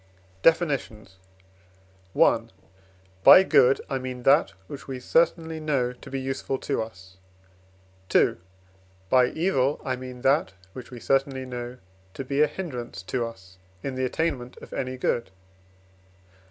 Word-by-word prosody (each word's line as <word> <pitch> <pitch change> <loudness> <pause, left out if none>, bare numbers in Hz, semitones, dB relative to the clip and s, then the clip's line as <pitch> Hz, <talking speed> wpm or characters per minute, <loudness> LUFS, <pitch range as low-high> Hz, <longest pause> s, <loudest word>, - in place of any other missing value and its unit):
DEFINITIONS. 130 - +1 1.0
I. - - +5 0.8
By 190 - +10
good 130 -7 +4
I 135 - -2
mean 130 -1 -6
that 135 - +5 0.2
which 140 +7 -9
we 130 -2 -5
certainly 165 +3 +1
know 135 -5 0
to 125 - -13
be 135 - -3
useful 135 0 -3
to 135 -1 -2
us. 95 -4 -10 1.0
II. - - +4 0.7
By 125 -1 +6
evil 145 -3 0
I 130 - 0
mean 125 -1 -9
that 135 -8 +2 0.2
which 125 -2 -9
we 125 - -9
certainly 135 +1 0
know 125 0 -6 0.4
to 135 - -5
be 140 +2 0
a 150 - +6
hindrance 125 - -6
to 120 +7 -2
us 95 -4 -14 0.2
in 135 - -3
the 130 0 -1
attainment 130 -3 -2
of - - -12
any 130 -1 -3
good. 120 -2 -1
130 Hz, 140 wpm, -26 LUFS, 125-140 Hz, 1.0 s, By